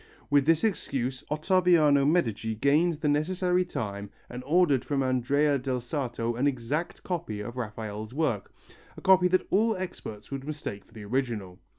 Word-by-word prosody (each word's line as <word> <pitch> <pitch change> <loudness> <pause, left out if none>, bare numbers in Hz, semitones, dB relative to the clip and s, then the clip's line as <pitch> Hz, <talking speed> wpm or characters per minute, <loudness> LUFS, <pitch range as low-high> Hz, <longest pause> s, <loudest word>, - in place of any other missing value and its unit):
With 145 0 +4
this 165 -1 +4
excuse 135 - -1
Ottaviano 155 -3 +4
Medici 115 - +1
gained 150 +8 +3
the 150 - 0
necessary 180 +5 +1
time 100 - -5 0.2
and 125 +1 -6
ordered 150 -5 +3
from 140 -2 0
Andrea 140 +3 +2
del 130 0 -2
Sarto 120 -2 -3
an 125 +5 +1
exact 140 +5 -2
copy 170 - -3
of 120 +4 -6
Raphael's 110 -2 -5
work, 130 -8 -1 0.5
a - - -9
copy 190 -1 +5
that 185 +1 +2
all 220 +3 +3
experts 110 - -7
would 135 -1 -4
mistake 140 -9 -6
for - - -24
the 110 -2 -9
original. 110 -6 -2
140 Hz, 160 wpm, -28 LUFS, 115-165 Hz, 0.5 s, copy